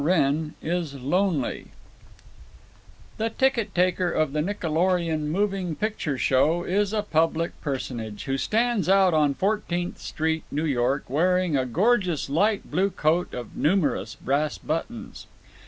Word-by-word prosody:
WRENN 155 -2 +1
IS 165 -3 -2
LONELY 150 +2 -1 1.5
The 225 +1 0
ticket 235 -4 0
taker 180 0 +2
of 155 -4 0
the 150 - +1
Nickelorion 170 -3 0
Moving 190 -1 -1
Picture 210 -10 -2
Show 155 +7 +2
is 200 +2 0
a 215 -1 0
public 165 -2 0
personage, 120 -7 -4
who 135 - -1
stands 225 - +1
out 190 -2 +5
on 150 -3 +3
Fourteenth 185 -3 -1
Street, 160 0 -2
New 150 +3 -2
York, 135 -1 0
wearing 180 +4 +2
a 130 -2 +1
gorgeous 180 - +1
light 205 +7 +1
blue 185 +6 +2
coat 170 0 0
of 120 -2 -7
numerous 145 - +1
brass 145 +3 -1
buttons. 155 -7 -5
165 Hz, 130 wpm, -25 LUFS, 145-190 Hz, 1.5 s, out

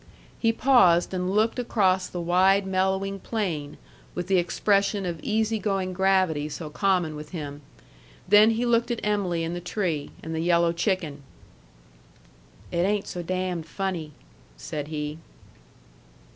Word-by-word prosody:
He 230 - +3
paused, 225 -9 +4
and 180 0 -1
looked 215 +5 +1
across 190 -6 +1
the 175 - -6
wide, 185 +3 +3
mellowing 190 +1 0
plain 170 -10 -3 0.4
with 180 - -3
the 190 +1 +2
expression 200 +3 +1
of 170 -2 -3
easy 220 0 0
going 195 -2 -1
gravity 185 -5 +2
so 155 0 -7
common 180 -2 +1
with 150 0 -8
him. 145 -4 -6 0.7
Then 210 +1 +7
he 230 +2 0
looked 235 0 +2
at 235 -1 -1
Em'ly 190 -5 0
in 165 +1 -3
the 175 - -4
tree 175 -5 -2
and 160 - -5
the 160 - -2
yellow 170 0 +3
chicken. 170 -5 -1 1.5
"It 175 - -3
ain't 205 +1 0
so 180 - -5
damned 180 -2 -3
funny," 170 -3 -4 0.4
said 145 - -5
he. 150 0 -4
185 Hz, 145 wpm, -26 LUFS, 165-200 Hz, 1.5 s, Then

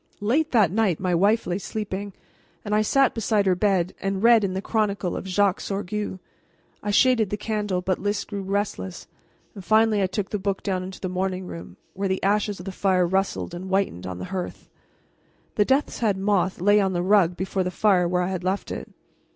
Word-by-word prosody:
Late 265 +10 +1
that 210 -9 +4
night 200 -5 +1
my 185 -1 0
wife 205 +6 +3
lay 180 +2 -2
sleeping, 200 -1 -5 0.5
and 210 - -2
I 210 - +4
sat 270 +5 +3
beside 215 -2 +1
her 190 - +4
bed 185 -2 +1
and 195 +1 -2
read 230 -2 +6
in 185 -1 -1
the - - -1
Chronicle 205 -5 -1
of - - -5
Jacques 195 +1 +2
Sorgue. 205 0 -3 0.6
I 205 - -4
shaded 225 0 +4
the 205 - -2
candle, 210 -4 -2
but 185 0 0
Lys 205 0 -1
grew 200 -2 -5
restless, 195 - -3 0.5
and 195 - -10
finally 215 +2 +3
I 190 - +2
took 195 +1 -4
the 210 - -1
book 195 0 -2
down 190 -2 -1
into 185 +1 -8
the 185 - -3
morning 185 0 -2
room, 90 - -9 0.2
where 195 0 -2
the 190 - -1
ashes 205 0 +1
of 180 - -10
the 195 - -4
fire 185 -1 +2
rustled 190 0 -1
and 175 +2 -6
whitened 190 - -1
on 90 -1 -5
the - - -6
hearth. 185 -2 -5 0.8
The 210 - +2
death's 270 +5 +1
head 210 -5 +1
moth 190 -2 +1
lay 205 +3 +4
on 190 -1 0
the 175 0 -1
rug 185 -3 +3
before 190 +1 -1
the 180 - -1
fire 180 -1 +2
where 180 +1 +1
I 180 - -1
had 185 -2 -3
left 190 +2 -2
it. - - -6
195 Hz, 210 wpm, -24 LUFS, 185-210 Hz, 0.8 s, read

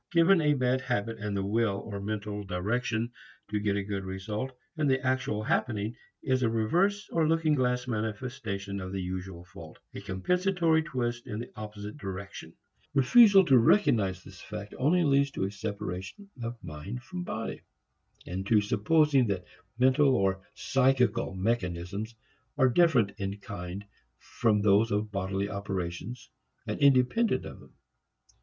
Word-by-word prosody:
Given 170 +1 +5
a 150 -1 +3
bad 130 0 +1
habit 115 -3 -2
and 105 -1 -3
the 95 - -1
"will" 105 -1 0
or 100 -2 -5
mental 105 0 -4
direction 110 +5 -1 0.4
to 105 - 0
get 105 -1 0
a 100 - -1
good 100 -1 -4
result, 100 +6 -4 0.3
and 155 -3 +1
the 130 0 +3
actual 130 -5 0
happening 110 0 -1 0.3
is 130 -3 +1
a 120 - +2
reverse 175 - +1
or 165 -2 +2
looking 160 -1 +2
glass 125 -2 0
manifestation 105 -3 -4
of 95 0 -6
the 95 - -3
usual 90 -1 -5
fault - - -12 0.2
a - - -7
compensatory 165 - +1
twist 120 -5 -3
in 105 - -4
the 120 +2 -6
opposite 105 +3 -8
direction. 95 -3 -7 0.4
Refusal 195 - +7
to 130 -5 +6
recognize 105 - +3
this 95 +3 -13
fact 105 0 -7
only 165 +7 +3
leads 140 -1 +3
to 135 - -4
a 95 - -1
separation 100 - -6
of 120 +1 -4
mind 90 +10 -7
from 180 +2 -6
body, 115 -9 -5 0.6
and 95 +2 -5
to 110 0 +5
supposing 135 +6 +3
that 95 -3 -2 0.3
mental 130 +2 +4
or 95 -1 +1
"psychical" 125 -3 +1
mechanisms 100 +1 -2 0.4
are 130 -2 +5
different 125 - +4
in 100 0 -3
kind 100 0 -7 0.3
from 105 -3 0
those 105 +2 +4
of 105 0 -1
bodily 100 0 -2
operations 100 +3 -5 0.3
and - - -4
independent 140 - +3
of - - -9
them. - - -18
110 Hz, 150 wpm, -29 LUFS, 100-130 Hz, 0.6 s, Refusal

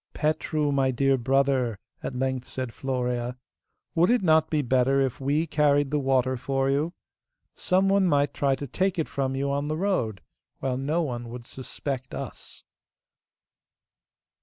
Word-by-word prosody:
'Petru, 155 -1 0
my 135 -1 +2
dear 135 +2 +2
brother,' 130 -2 +1 0.2
at 125 - -4
length 130 0 -1
said 130 -3 -5
Florea, 125 -2 -2 0.6
'would 170 +4 +3
it 245 -3 +3
not 160 -2 +4
be 150 -2 +1
better 130 +2 +3
if 135 -1 -1
we 145 +4 +1
carried 145 -2 +2
the 150 - +2
water 130 -1 +2
for 135 +2 0
you? 150 +5 0 0.6
Some 190 +1 +1
one 195 -1 +4
might 145 -3 +2
try 140 -1 +1
to 140 - -6
take 185 +7 0
it 160 - 0
from 135 -1 -2
you 140 +1 -1
on 140 +1 -1
the 155 +1 -1
road, 140 - -1 0.4
while 130 -1 -2
no 150 +6 0
one 120 -5 -4
would 120 0 -8
suspect 130 0 -6
us. 135 -2 -8
135 Hz, 160 wpm, -26 LUFS, 130-150 Hz, 0.6 s, not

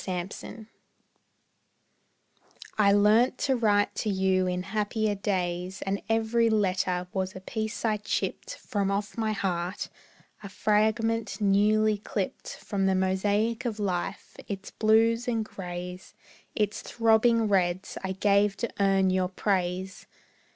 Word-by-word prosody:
Aftermath 185 +4 -5 2.1
I 200 -2 +4
learnt 215 +5 +4
to 265 - +1
write 205 -4 +2
to 215 - -1
you 190 -1 +2
in 180 0 -2
happier 210 +2 -1
days, 185 -1 -2
And 195 +1 -2
every 225 +1 +2
letter 185 -4 +1
was 190 -1 -2
a - - -6
piece 215 +2 -4
I 215 -1 +2
chipped 215 - -3
From 200 - -2
off 200 +1 -2
my 220 -2 -1
heart, 180 -2 -2 0.5
a 200 - -8
fragment 220 +2 +1
newly 210 +1 +3
clipped 200 -2 -4
From 195 -2 -2
the 190 - +2
mosaic 205 +5 +1
of 230 -4 -3
life; 185 -4 -3
its 195 -1 -6
blues 225 +2 +3
and 225 -3 0
grays, 180 -1 -7 0.4
Its 210 -1 -1
throbbing 230 0 +3
reds, 185 -1 0
I 190 0 -2
gave 200 +1 +2
to 235 - -3
earn 195 -1 +3
your 185 -1 +1
praise. 185 -1 -2
205 Hz, 130 wpm, -27 LUFS, 190-220 Hz, 2.1 s, I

